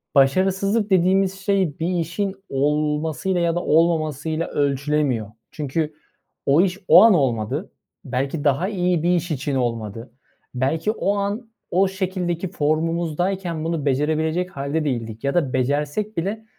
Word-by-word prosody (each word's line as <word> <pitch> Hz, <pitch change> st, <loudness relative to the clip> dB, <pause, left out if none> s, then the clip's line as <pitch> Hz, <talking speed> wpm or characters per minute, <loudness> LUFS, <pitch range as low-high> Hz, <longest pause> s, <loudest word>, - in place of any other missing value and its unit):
"başarısızlık" 190 Hz, +9 st, +2 dB
dediğimiz 190 Hz, +1 st, +2 dB
şey 195 Hz, -6 st, 0 dB
bir 165 Hz, -, -1 dB
işin 190 Hz, +4 st, -2 dB
olmasıyla 150 Hz, +6 st, 0 dB
ya 170 Hz, -1 st, +1 dB
da 175 Hz, -, -1 dB
olmamasıyla 160 Hz, -1 st, +1 dB
ölçülemiyor. 140 Hz, -4 st, 0 dB, 0.2 s
Çünkü 155 Hz, +1 st, -2 dB, 0.5 s
o 140 Hz, +4 st, +5 dB
iş 185 Hz, 0 st, 0 dB
o -, -, +9 dB
an 225 Hz, -2 st, +7 dB
olmadı. 120 Hz, -, 0 dB, 0.3 s
Belki 135 Hz, +4 st, -2 dB
daha 145 Hz, +5 st, +2 dB
iyi 180 Hz, -5 st, 0 dB
bir 175 Hz, +1 st, +3 dB
iş 175 Hz, 0 st, -2 dB
için 140 Hz, -1 st, -2 dB
olmadı. 115 Hz, -2 st, -3 dB, 0.4 s
Belki 155 Hz, +10 st, 0 dB
o 205 Hz, -2 st, 0 dB
an 205 Hz, +4 st, -3 dB, 0.2 s
o 190 Hz, +2 st, +3 dB
şekildeki 185 Hz, -2 st, -3 dB
formumuzdayken 165 Hz, +2 st, -1 dB
bunu 165 Hz, -3 st, -2 dB
becerebilecek 155 Hz, +5 st, 0 dB
hâlde 140 Hz, +3 st, -2 dB
değildik 115 Hz, -5 st, -3 dB
ya 140 Hz, 0 st, 0 dB
da 145 Hz, -7 st, 0 dB
becersek 145 Hz, -, -1 dB
bile, 205 Hz, +6 st, -2 dB
160 Hz, 135 wpm, -22 LUFS, 140-185 Hz, 0.5 s, o